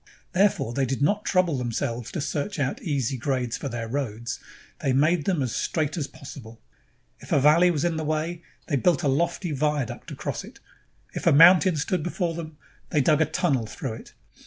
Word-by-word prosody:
Therefore 190 - +2
they 135 +1 0
did 135 +2 -1
not 205 +8 +1
trouble 180 -7 +2
them 120 -1 -2
selves 115 +1 -3
to 165 - -2
search 155 +7 -3
out 145 - -1
easy 140 - -1
grades 125 -2 -1
for 140 - -4
their 115 -2 -4
roads; 120 -2 -3 0.4
they 135 - 0
made 155 +4 +2
them 175 -8 +1
as 125 - -3
straight 155 -2 -1
as 150 -5 -2
possible. 125 -6 -11 0.6
If - - -13
a - - +4
valley 155 +6 +5
was 160 -2 0
in 170 -2 0
the 160 - -2
way, 155 +3 -2 0.2
they 145 - 0
built 165 +2 +2
a - - +2
lofty 170 +5 0
viaduct 150 -3 -2
across - - -4
it. - - -13 0.5
If - - -3
a - - +7
mountain 175 +4 +7
stood 175 +4 -1
before 175 +1 -2
them, 160 -2 -7 0.3
they 150 - +2
dug 150 +3 +3
a - - +5
tunnel 145 -7 0
through 110 - -5
it. 115 - -11
150 Hz, 200 wpm, -25 LUFS, 130-170 Hz, 0.6 s, a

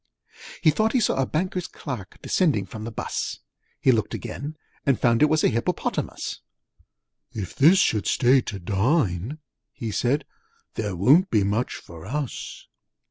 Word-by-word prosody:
He 155 - +5
thought 220 +8 +1
he 260 - +4
saw 210 - +1
a 130 - 0
Banker's 180 +2 -2
Clerk 120 - -7
Descending 145 - +2
from 110 +3 -8
the 115 - -5
bus: - - -3 0.4
He 130 - +4
looked 110 -3 0
again, 150 +3 -6 0.3
and 135 -4 +2
found 115 -1 +3
it 150 - +6
was 155 0 +2
A - - +6
Hippopotamus. 115 +1 -2 0.9
'If 100 -5 -5
this 165 +8 +6
should 110 - +2
stay 130 +1 +4
to 105 - -5
dine,' 100 - 0 0.3
he 115 -2 -5
said, 125 +7 0 0.5
'There 105 -4 -3
won't 140 - +5
be 105 -3 +3
much 105 +5 0
for 85 +1 -11
us!' 140 +2 -4
125 Hz, 155 wpm, -25 LUFS, 105-150 Hz, 0.9 s, it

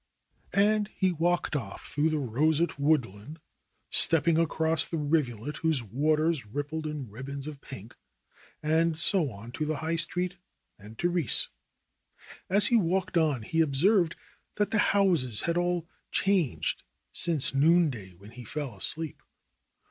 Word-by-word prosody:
And 210 +1 +2
he 190 -1 +1
walked 175 -1 0
off 110 -9 -5
through 150 +2 0
the 155 - -1
roseate 150 +5 0
woodland, 140 -2 -1 0.5
step 165 -3 +4
ping 170 -1 +2
across 160 0 +1
the 165 - -4
rivulet 145 -3 -1
whose 160 -6 0
waters 155 - 0
rippled 145 +8 -5
in 150 -4 -5
ribbons 135 +6 -8
of 150 -2 -8
pink, 115 -3 -11 0.7
and 160 +1 +1
so 165 -2 +4
on 115 +1 -11
to 155 - -4
the 155 - -1
High 160 +3 -2
Street 180 +2 +1 0.4
and 105 +2 -13
Therese. 175 -6 +1 1.0
As 200 +3 +6
he 240 - +6
walked 185 -1 0
on 150 -8 +1
he 165 +9 0
observed 165 +5 +2 0.4
that 205 -1 -1
the 220 - +1 0.2
houses 160 - +2
had 170 - -1
all 175 -1 -1 0.2
changed 190 -8 0 0.3
since 160 -7 0
noonday, 140 - +2
when 100 +5 -15
he 125 +1 -11
fell 135 0 -5
asleep. 155 +10 -3
155 Hz, 140 wpm, -28 LUFS, 135-170 Hz, 1.0 s, As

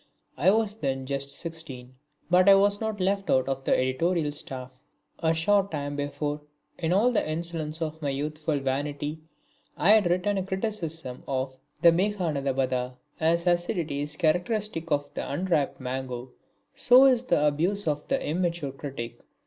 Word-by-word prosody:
I 160 +8 +3
was 215 0 +1
then 135 -6 -2
just 140 +1 -3
sixteen, 140 -6 -7 0.3
but 180 +3 +5
I 195 - +9
was 205 +1 +3
not 220 -2 -2
left 195 +1 0
out 130 0 +3
of 135 0 -2
the - - +3
editorial 150 +5 +1
staff. 135 -4 -6 0.5
A 160 -1 +2
short 195 +5 +2
time 145 -3 -3
before, 145 +1 -3 0.4
in 165 -1 0
all 215 +7 +4
the 210 -9 0
insolence 160 -1 -3
of 160 0 -5
my 145 - -1
youthful 150 +2 -2
vanity, 145 +3 -2 0.6
I 200 - +5
had 215 -5 +5
written 185 +3 +1
a - - -2
criticism 180 - -4
of 130 -1 -2 0.3
the 170 - +9
Meghanadabadha. 140 -9 0 0.2
As 170 +2 +2
acidity 175 -4 0
is 150 +1 -3
characteristic 180 +1 0
of 145 -1 -1
the - - -4
unripe 160 -2 0
mango 130 -1 -5 0.4
so 255 +2 +7
is 255 -2 +3
abuse 165 +7 +1
of 150 -1 -1
the - - +1
immature 170 -2 -1
critic. 135 -4 -7
160 Hz, 155 wpm, -27 LUFS, 140-185 Hz, 0.6 s, I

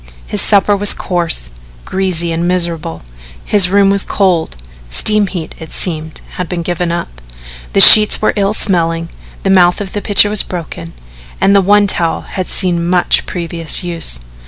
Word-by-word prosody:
His - - -1
supper 205 0 +2
was 205 0 +3
coarse, 170 - -2 0.3
greasy 180 -3 -2
and 165 +1 -2
miserable, 170 - -3 0.4
his 195 -3 +4
room 195 0 +2
was 200 0 0
cold 180 - -1 0.3
(steam 210 - +2
heat, 175 -4 -7
it 160 - -11
seemed, 160 -3 -3 0.2
had 180 - -4
been 175 -2 -4
given 175 0 -3
up), 65 - -6 0.5
the - - +4
sheets 210 -1 +8
were 215 - 0
ill 200 0 -1
smelling, 165 -4 -1 0.3
the 195 - 0
mouth 180 -2 +3
of 200 -2 -7
the 205 - -4
pitcher 205 0 +2
was 210 - +2
broken, 155 - -8 0.5
and 200 - +2
the 200 - +4
one 205 +2 +3
towel 170 -4 -2
had 185 -1 -7
seen 175 -2 0
much 180 -1 +1
previous 170 -2 -1
use. 165 - -2
180 Hz, 165 wpm, -12 LUFS, 165-195 Hz, 0.5 s, sheets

